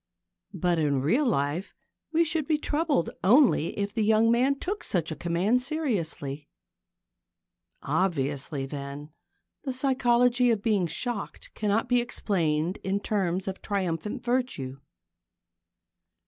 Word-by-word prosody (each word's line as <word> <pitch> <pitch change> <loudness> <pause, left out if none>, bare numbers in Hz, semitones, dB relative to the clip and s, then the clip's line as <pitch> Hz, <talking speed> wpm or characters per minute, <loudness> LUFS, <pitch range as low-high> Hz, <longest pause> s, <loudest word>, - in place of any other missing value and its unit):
But 175 -1 +1
in 140 -4 +1
real 250 - +2
life 150 - -1 0.4
we 330 +1 +4
should 315 -2 -1
be 310 - +2
troubled 295 - 0
only 230 - +4
if 200 0 -2
the 220 - 0
young 220 +2 +4
man 260 +4 +3
took 400 +8 -4
such 170 -3 -1
a - - -3
command 180 +10 +1
seriously. 175 - -2 1.4
Obviously, 145 -3 -1
then, 140 +2 -7 0.5
the 270 - -3
psychology 250 -2 +3
of 220 -3 +1
being 205 -6 +2
shocked 225 +6 -4
cannot 215 +2 0
be 245 0 +3
explained 175 -7 0
in 195 +1 -2
terms 190 -3 -1
of 190 0 -4
triumphant 195 0 -2
virtue. 240 - -2
200 Hz, 120 wpm, -27 LUFS, 160-245 Hz, 1.4 s, we